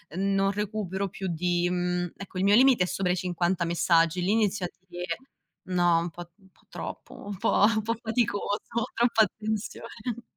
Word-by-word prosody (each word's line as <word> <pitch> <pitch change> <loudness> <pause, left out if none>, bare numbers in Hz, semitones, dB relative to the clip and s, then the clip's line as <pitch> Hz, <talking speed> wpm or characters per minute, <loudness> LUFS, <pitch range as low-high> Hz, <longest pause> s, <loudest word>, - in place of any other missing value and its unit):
non 195 +1 +2
recupero 200 -2 -2
più 190 +1 -5
di 175 +1 0
mhmm, 180 -1 -1
ecco 195 -1 -9
il 185 - +1
mio 200 +1 +6
limite 255 -4 +6
è - - -6
sopra 185 -1 0
i 180 - 0
50 175 0 0
messaggi, 170 0 +2
lì 180 +3 +1
inizio 210 -4 +1
a - - -16 0.2
dire: 175 -1 -4 0.5
"No, 175 -2 +3
un 170 +1 -2
po' 175 +1 -10
un 190 -2 -23
po' - - -29
troppo, - - -7
un 205 - -4
po' 195 - +3
un 220 -1 +1
po' 230 +2 -1
faticoso, 220 -3 0 0.3
troppa 235 -2 +4
attenzione." 220 +3 -4
190 Hz, 180 wpm, -27 LUFS, 175-215 Hz, 0.5 s, mio